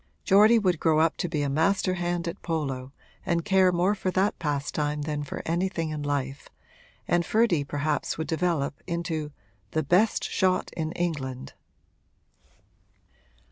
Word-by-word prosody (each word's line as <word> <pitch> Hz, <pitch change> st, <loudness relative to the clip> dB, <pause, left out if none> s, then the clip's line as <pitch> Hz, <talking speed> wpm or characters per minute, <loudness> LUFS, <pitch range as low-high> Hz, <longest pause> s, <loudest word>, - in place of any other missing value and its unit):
Geordie 215 Hz, +4 st, +6 dB
would 185 Hz, -7 st, +1 dB
grow 160 Hz, -1 st, +3 dB
up 160 Hz, 0 st, +3 dB
to 175 Hz, -, -2 dB
be 150 Hz, -3 st, -1 dB
a -, -, 0 dB
master 165 Hz, +6 st, +1 dB
hand 175 Hz, -1 st, -2 dB
at 170 Hz, -, -5 dB
polo 135 Hz, -6 st, -3 dB, 0.3 s
and 170 Hz, -2 st, 0 dB
care 190 Hz, -2 st, +4 dB
more 180 Hz, +3 st, +2 dB
for 195 Hz, -2 st, -2 dB
that 190 Hz, +3 st, +1 dB
pastime 150 Hz, 0 st, -2 dB
than 150 Hz, -1 st, -3 dB
for 145 Hz, -, -6 dB
anything 170 Hz, -1 st, -1 dB
in 150 Hz, -1 st, -4 dB
life, 140 Hz, -1 st, -3 dB, 0.6 s
and 175 Hz, 0 st, +2 dB
Ferdy 215 Hz, -6 st, +2 dB
perhaps 145 Hz, +1 st, -2 dB
would 160 Hz, -, -2 dB
develop 160 Hz, -4 st, -1 dB
into 165 Hz, -3 st, -3 dB, 0.4 s
'the 155 Hz, -, +1 dB
best 185 Hz, +9 st, +3 dB
shot 185 Hz, -1 st, 0 dB
in 160 Hz, -1 st, -2 dB
England.' 140 Hz, -7 st, -3 dB
165 Hz, 145 wpm, -26 LUFS, 150-180 Hz, 0.6 s, Geordie